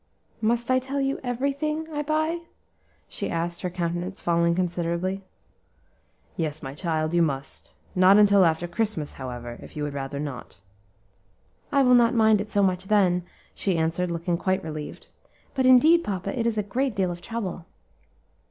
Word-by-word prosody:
"Must 235 Hz, +3 st, +1 dB
I 255 Hz, -, +4 dB
tell 270 Hz, +2 st, -3 dB
you 275 Hz, 0 st, 0 dB
every 255 Hz, +3 st, -1 dB
thing 305 Hz, +2 st, -2 dB
I 295 Hz, -, -1 dB
buy?" 315 Hz, +3 st, 0 dB, 0.7 s
she -, -, -4 dB
asked, 170 Hz, +1 st, -2 dB
her 180 Hz, -, -2 dB
countenance 175 Hz, +1 st, -3 dB
falling 170 Hz, 0 st, +2 dB
considerably. 180 Hz, +1 st, -1 dB, 1.1 s
"Yes, 155 Hz, -2 st, -3 dB
my 135 Hz, 0 st, -5 dB
child, 155 Hz, 0 st, -1 dB
you 175 Hz, -, +4 dB
must; 140 Hz, -4 st, -3 dB, 0.2 s
not 185 Hz, +2 st, +6 dB
until 200 Hz, -2 st, +6 dB
after 165 Hz, 0 st, +1 dB
Christmas, 205 Hz, -5 st, -2 dB
however, 120 Hz, -2 st, -6 dB
if -, -, -12 dB
you 150 Hz, -, -2 dB
would 145 Hz, -1 st, -3 dB
rather 140 Hz, 0 st, -4 dB
not." 140 Hz, -8 st, -6 dB, 1.1 s
"I 280 Hz, -1 st, +4 dB
will 250 Hz, -1 st, +5 dB
not 240 Hz, -1 st, +5 dB
mind 220 Hz, -2 st, +4 dB
it 210 Hz, -, -6 dB
so 205 Hz, -2 st, +2 dB
much 185 Hz, -1 st, +1 dB
then," 190 Hz, -3 st, +3 dB, 0.3 s
she 190 Hz, -4 st, -1 dB
answered, 165 Hz, +3 st, 0 dB
looking 170 Hz, 0 st, -1 dB
quite 190 Hz, +2 st, 0 dB
relieved; 155 Hz, -2 st, -7 dB, 0.4 s
"but 260 Hz, -2 st, +2 dB
indeed, 310 Hz, +7 st, +6 dB
papa, 195 Hz, +6 st, -3 dB
it 230 Hz, -, +1 dB
is 225 Hz, -2 st, -1 dB
a 210 Hz, -, +1 dB
great 250 Hz, +4 st, -1 dB
deal 185 Hz, -2 st, +1 dB
of 175 Hz, 0 st, -7 dB
trouble." 190 Hz, -5 st, -5 dB
185 Hz, 170 wpm, -25 LUFS, 170-235 Hz, 1.1 s, not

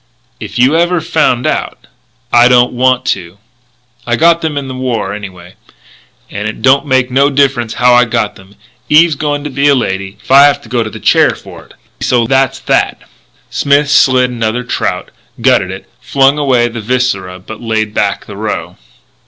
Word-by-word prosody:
"If -, -, -8 dB
you 130 Hz, +5 st, +3 dB
ever 175 Hz, +1 st, +1 dB
found 155 Hz, -7 st, 0 dB
out -, -, -3 dB, 0.2 s
" 125 Hz, -1 st, -32 dB
"I -, -, +6 dB
don't 125 Hz, 0 st, +3 dB
want 130 Hz, 0 st, +1 dB
to. 90 Hz, 0 st, -11 dB, 0.7 s
I 120 Hz, -, +1 dB
got 170 Hz, +5 st, +3 dB
them 155 Hz, -3 st, -3 dB
in 140 Hz, -1 st, -4 dB
the 130 Hz, -, -6 dB
war, 125 Hz, -6 st, -3 dB
anyway. 95 Hz, -4 st, -10 dB, 0.8 s
And 105 Hz, +1 st, -4 dB
it 110 Hz, -, -7 dB
don't 135 Hz, +3 st, +3 dB
make 130 Hz, -2 st, +1 dB
no 140 Hz, +2 st, +3 dB
difference 135 Hz, -5 st, 0 dB
how 125 Hz, 0 st, +3 dB
I 125 Hz, 0 st, +5 dB
got 110 Hz, -3 st, -2 dB
'em; 95 Hz, +1 st, -18 dB, 0.3 s
Eve's 160 Hz, +2 st, +5 dB
going 145 Hz, 0 st, -3 dB
to 150 Hz, -, -5 dB
be 140 Hz, +2 st, 0 dB
a 140 Hz, -, +4 dB
lady 95 Hz, -5 st, -3 dB
if -, -, -11 dB
I 140 Hz, +2 st, +7 dB
go 120 Hz, +1 st, -3 dB
to 110 Hz, -, -3 dB
the -, -, -10 dB
chair -, -, +3 dB
for -, -, -13 dB
it. -, -, -21 dB, 0.2 s
So 120 Hz, -2 st, +1 dB
that's 135 Hz, +2 st, +1 dB
that." -, -, 0 dB, 0.5 s
Smith 140 Hz, +1 st, +1 dB
slit 130 Hz, -2 st, +3 dB
another 115 Hz, 0 st, -2 dB
trout, 125 Hz, -, -3 dB, 0.3 s
gutted -, -, +2 dB
it, -, -, -9 dB
flung 140 Hz, +1 st, +1 dB
away 130 Hz, -4 st, +2 dB
the 115 Hz, -1 st, -7 dB
viscera 105 Hz, -6 st, -2 dB
but 100 Hz, +4 st, -11 dB
laid 110 Hz, -2 st, -2 dB
back -, -, -1 dB
the -, -, -10 dB
roe. -, -, -5 dB
125 Hz, 185 wpm, -12 LUFS, 115-140 Hz, 0.8 s, I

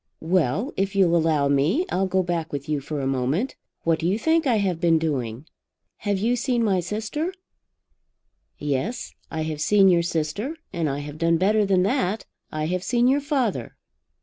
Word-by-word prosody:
"Well; 180 Hz, -, +1 dB
if 195 Hz, +1 st, -1 dB
you'll 180 Hz, -3 st, +4 dB
allow 160 Hz, -4 st, +2 dB
me 145 Hz, -, +2 dB
I'll 190 Hz, +1 st, +1 dB
go 190 Hz, 0 st, +1 dB
back 170 Hz, -2 st, -2 dB
with 140 Hz, 0 st, -5 dB
you 150 Hz, -1 st, 0 dB
for 145 Hz, +2 st, -4 dB
a -, -, -2 dB
moment. 135 Hz, -, 0 dB, 0.3 s
What 165 Hz, -1 st, +2 dB
do 165 Hz, -, 0 dB
you 195 Hz, +4 st, +2 dB
think 320 Hz, +4 st, +2 dB
I 245 Hz, -, +3 dB
have 190 Hz, -5 st, 0 dB
been 165 Hz, -2 st, +4 dB
doing?" 135 Hz, -5 st, -2 dB, 0.5 s
"Have 205 Hz, -2 st, -1 dB
you 230 Hz, +5 st, +1 dB
seen 245 Hz, -1 st, 0 dB
my 195 Hz, -4 st, +2 dB
sister?" 220 Hz, -, -3 dB, 1.3 s
"Yes, 150 Hz, -, -2 dB, 0.2 s
I 160 Hz, -, -3 dB
have 155 Hz, -1 st, -4 dB
seen 195 Hz, +3 st, +5 dB
your 175 Hz, -2 st, +4 dB
sister. 170 Hz, -, -2 dB, 0.2 s
And 165 Hz, -3 st, 0 dB
I 140 Hz, +1 st, -3 dB
have 145 Hz, +1 st, -8 dB
done 165 Hz, 0 st, +3 dB
better 205 Hz, +3 st, +2 dB
than 185 Hz, -2 st, +3 dB
that. 215 Hz, -2 st, 0 dB, 0.3 s
I 155 Hz, 0 st, -2 dB
have 180 Hz, +2 st, -1 dB
seen 240 Hz, +2 st, +2 dB
your 275 Hz, +3 st, +3 dB
father. 255 Hz, -, -1 dB
180 Hz, 185 wpm, -24 LUFS, 155-215 Hz, 1.3 s, seen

